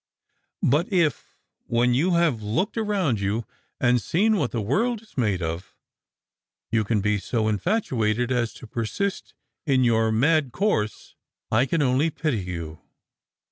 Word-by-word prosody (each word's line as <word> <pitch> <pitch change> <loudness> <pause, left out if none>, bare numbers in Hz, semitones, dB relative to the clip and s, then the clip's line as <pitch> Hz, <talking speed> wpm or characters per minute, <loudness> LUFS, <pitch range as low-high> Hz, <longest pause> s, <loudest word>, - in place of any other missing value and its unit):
But 150 +9 +2
if, 170 -8 0 0.3
when 120 +1 +2
you 170 +8 +2
have 165 -10 +2
looked 120 - -1
around 200 - 0
you, 105 +4 -1 0.3
and 125 -1 +3
seen 205 - +2
what 145 -9 0
the 120 - -3
world 220 - 0
is 220 - -23
made 105 -8 0
of, 80 +2 -5 1.0
you 115 -1 +2
can 105 0 0
be 105 0 +1
so 110 +2 -1
in 105 -2 0
fatuated 125 - 0
as 120 -3 0
to - - -11
persist 120 - -3 0.3
in 130 -2 +3
your 115 -2 +3
mad 140 +4 +2
course, 130 - -1 0.4
I 120 +5 +3
can 160 +2 +1
only 135 +5 +2
pity 150 -6 -1
you." 85 -4 -6
125 Hz, 150 wpm, -24 LUFS, 110-165 Hz, 1.0 s, and